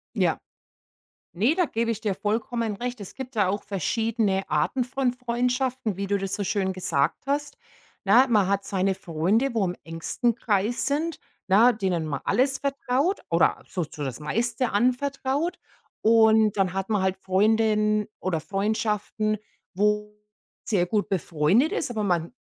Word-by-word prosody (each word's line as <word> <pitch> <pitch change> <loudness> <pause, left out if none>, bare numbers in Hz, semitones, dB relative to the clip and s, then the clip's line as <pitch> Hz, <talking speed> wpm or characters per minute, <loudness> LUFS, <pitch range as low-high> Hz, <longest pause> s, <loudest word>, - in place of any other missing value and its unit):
Ja. - - +1 0.9
Ne, 220 - +2
da 360 -1 +2
gebe 230 -3 -1
ich 220 - -4
dir 205 -4 -1
vollkommen 220 +1 -2
recht. 245 -1 -4
Es 195 - -9
gibt 265 -2 -8
da 200 -3 +2
auch 205 +1 -2
verschiedene 205 +1 -1
Arten 255 -2 +1
von 260 0 -1
Freundschaften, 250 -2 -1
wie 200 0 -3
du 200 0 +1
das 195 0 -4
so 205 - -1
schön 190 -1 0
gesagt 165 - -1
hast. 290 +1 -1 0.5
Na, 260 - +6
man 210 -5 +3
hat 200 0 0
seine 190 0 0
Freunde, 195 - 0
wo 215 -4 +1
im 180 - -3
engsten 165 +8 -1
Kreis 215 +1 0
sind, 310 +4 -1 0.3
na, 220 +6 +6
denen 185 -6 -1
man 145 -3 -3
alles 270 +2 +2
vertraut 280 +5 0
oder - - +2
so 180 -4 -2
so 150 -1 -7
das 135 0 -4
meiste 230 - -1
anvertraut, 270 - 0 0.4
und 220 -1 +5
dann 190 -2 +1
hat 195 +2 -3
man 210 -3 +1
halt 190 0 0
Freundinnen 215 +2 +2
oder 175 -4 -1
Freundschaften, 215 +2 -1 0.4
wo 210 +2 0 0.5
sehr 185 -5 +1
gut 210 +2 -1
befreundet 185 - +2
ist, - - -1
aber 215 -2 -2
man 175 -2 0
215 Hz, 160 wpm, -25 LUFS, 190-245 Hz, 0.9 s, Na